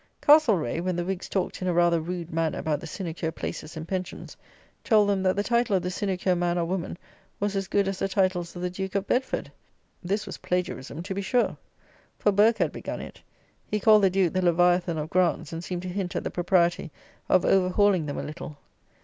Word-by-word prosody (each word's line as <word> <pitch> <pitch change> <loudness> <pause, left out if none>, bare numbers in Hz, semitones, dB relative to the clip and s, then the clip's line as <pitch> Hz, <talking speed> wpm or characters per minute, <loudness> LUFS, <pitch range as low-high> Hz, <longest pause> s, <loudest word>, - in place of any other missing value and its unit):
Castlereagh, 220 - +4
when 185 0 -1
the 175 0 -2
Whigs 190 0 -4
talked 190 -1 -2
in 185 - -2
a 180 - +1
rather 170 -1 +3
rude 170 0 -5
manner 165 -1 0
about 150 -2 -1
the 165 - -8
sinecure 165 -2 -4
places 160 0 -6
and 160 +1 -6
pensions, 185 -1 -5 0.5
told 215 -4 +4
them, 200 -2 +1
that 185 0 +2
the 205 - 0
title 235 -2 +2
of 185 - +1
the 180 - -2
sinecure 185 -1 0
man 175 0 0
or 170 - +1
woman 175 0 -3 0.4
was 205 0 -1
as 195 -1 -1
good 200 -1 +1
as 195 -1 -3
the - - 0
titles 185 -3 0
of 175 - -6
the 180 - 0
Duke 190 +1 -5
of 200 -1 0
Bedford! 255 +5 -1 0.5
this 200 +4 -1
was 195 - -7
plagiarism, 175 -4 -3
to 190 +1 -4
the 200 - -3
sure; 245 +5 +1 0.6
for 205 - +2
Burke 215 +3 +4
had - - +1
begun - - -6
it. - - -10 0.5
He 210 - -1
called 215 +1 +6
the 195 - +5
Duke 185 -2 +1
the 185 - +1
Leviathan 175 -1 +3
of 155 +1 -4
grants; 175 -3 +1
and 165 +1 -5
seemed 175 0 -4
to - - -5
hint 180 0 -3
at - - -1
the - - -3
propriety 175 -2 +1 0.4
of 185 - +4
over 185 -1 +3
hauling 190 -4 +3
them 145 - -4
a - - -3
little. 155 -1 -8
185 Hz, 220 wpm, -26 LUFS, 175-195 Hz, 0.6 s, called